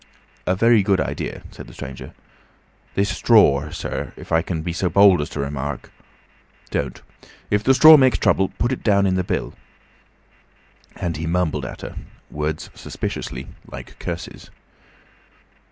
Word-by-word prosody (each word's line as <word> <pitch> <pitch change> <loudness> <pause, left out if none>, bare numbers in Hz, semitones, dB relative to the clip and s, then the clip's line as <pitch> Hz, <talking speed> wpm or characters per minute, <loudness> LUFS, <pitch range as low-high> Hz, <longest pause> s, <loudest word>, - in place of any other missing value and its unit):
"A 90 - +2
very 115 +2 +4
good 95 -1 +2
idea," - - -4
said - - -11
the - - -14
stranger. 65 0 -9 0.8
"This 100 +1 +1
stror, 100 - +4
sir, - - -5
if - - -12
I 80 - +5
might 80 -1 -3
make 85 - -2
so 90 0 0
bold 100 -1 +6
as 75 - -4
to - - -6
remark—" 70 -1 -4 0.8
"Don't. 65 -3 -3 0.5
If 105 0 +2
the 135 +3 +4
straw 155 +3 +10
makes 130 -2 +4
trouble 95 -1 +2
put 120 - 0
it 130 - -3
down 100 -2 +3
in 95 - +2
the 95 0 0
bill." - - -3 1.4
And 85 -3 -3
he 80 +1 -4
mumbled 80 -5 0
at - - -8
her—words 75 +1 -6
suspiciously 65 +2 -5 0.2
like - - -10
curses. 85 +1 -6
90 Hz, 150 wpm, -21 LUFS, 75-100 Hz, 1.4 s, straw